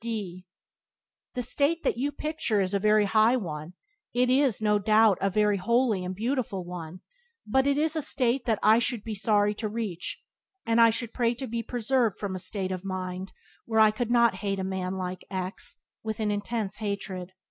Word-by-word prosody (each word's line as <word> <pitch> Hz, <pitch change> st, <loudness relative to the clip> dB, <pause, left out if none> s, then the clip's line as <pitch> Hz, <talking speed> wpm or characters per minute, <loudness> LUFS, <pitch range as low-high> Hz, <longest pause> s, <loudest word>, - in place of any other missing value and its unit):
D 195 Hz, -6 st, -5 dB, 0.9 s
The 250 Hz, -, -1 dB
state 290 Hz, +7 st, +1 dB
that -, -, +1 dB
you 275 Hz, +5 st, -1 dB
picture 300 Hz, -9 st, -1 dB
is 190 Hz, 0 st, 0 dB
a 200 Hz, -, +2 dB
very 215 Hz, +1 st, +4 dB
high 220 Hz, +4 st, +4 dB
one 160 Hz, -5 st, -6 dB, 0.2 s
— 415 Hz, -, -57 dB
it 250 Hz, 0 st, +3 dB
is, 265 Hz, -3 st, +3 dB
no 210 Hz, -1 st, +2 dB
doubt, 215 Hz, -1 st, +4 dB
a 195 Hz, -, +2 dB
very 210 Hz, +1 st, +2 dB
holy 230 Hz, 0 st, +1 dB
and 180 Hz, +1 st, -4 dB
beautiful 220 Hz, -4 st, -2 dB
one 175 Hz, 0 st, -7 dB, 0.2 s
— 475 Hz, -1 st, -44 dB
but 265 Hz, +5 st, +2 dB
it 280 Hz, 0 st, +2 dB
is 315 Hz, +1 st, +1 dB
a 315 Hz, -, 0 dB
state 255 Hz, -2 st, +1 dB
that 225 Hz, -3 st, +2 dB
I 220 Hz, +2 st, +6 dB
should 235 Hz, -2 st, -1 dB
be 225 Hz, -, -4 dB
sorry 210 Hz, 0 st, +2 dB
to 215 Hz, +1 st, -3 dB
reach; 205 Hz, -6 st, -4 dB, 0.5 s
and 230 Hz, 0 st, +3 dB
I 230 Hz, -, +8 dB
should 230 Hz, 0 st, -3 dB
pray 240 Hz, -1 st, +1 dB
to 265 Hz, +2 st, -5 dB
be 235 Hz, -1 st, -3 dB
preserved 240 Hz, -1 st, 0 dB
from 200 Hz, -2 st, -4 dB
a 185 Hz, -, -4 dB
state 190 Hz, 0 st, -3 dB
of 185 Hz, 0 st, -4 dB
mind 185 Hz, 0 st, -4 dB, 0.3 s
where 220 Hz, -1 st, +1 dB
I 215 Hz, -1 st, +7 dB
could 230 Hz, +2 st, -3 dB
not 235 Hz, -4 st, +4 dB
hate 200 Hz, -1 st, -1 dB
a 190 Hz, -, -2 dB
man 190 Hz, 0 st, -3 dB
like 185 Hz, -1 st, -4 dB
X 185 Hz, 0 st, -4 dB, 0.3 s
with 220 Hz, 0 st, -4 dB
an 215 Hz, -1 st, 0 dB
intense 205 Hz, 0 st, -3 dB
hatred. 195 Hz, -3 st, -4 dB
215 Hz, 205 wpm, -27 LUFS, 190-235 Hz, 0.9 s, I